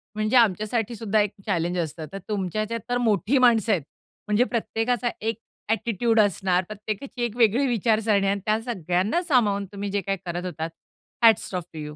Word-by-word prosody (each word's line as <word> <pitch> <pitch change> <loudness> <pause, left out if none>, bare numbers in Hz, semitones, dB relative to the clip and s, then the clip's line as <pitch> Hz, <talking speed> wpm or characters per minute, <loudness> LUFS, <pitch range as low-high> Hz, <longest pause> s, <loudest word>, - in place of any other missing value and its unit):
म्हणजे 215 +3 0
आमच्यासाठी 225 +1 +2
सुद्धा 215 0 0
एक 205 - 0
चॅलेंज 175 -3 -1
असतं. 160 -1 -4
तर - - -4
तुमच्या 205 0 -1
हेच्यात 230 +2 -3
तर 245 - +1
मोठी 225 +2 +2
माणसं 230 -4 +4
आहेत. 185 - +2 0.5
म्हणजे 210 +3 +3
प्रत्येकाचा 240 0 -1
एक 225 0 -1 0.3
ॲटिट्यूड 225 0 +1
असणार. 190 -3 +2
प्रत्येकाची 215 +4 -6
एक 235 -1 -2
वेगळी 235 +4 +4
विचारसरणी 220 -4 +2
आणि 200 +1 +1
त्या 215 +1 +2
सगळ्यांना 195 - 0
सामावून 215 - +2
तुम्ही 200 0 -4
जे 200 0 0
काही 195 +1 -2
करत 175 +1 -4
होतात 160 -2 -4 0.5
हॅट्स 225 -3 +5
ऑफ 180 - -2
टू 155 - -7
यू. 150 0 -7
215 Hz, 175 wpm, -25 LUFS, 195-230 Hz, 0.5 s, हॅट्स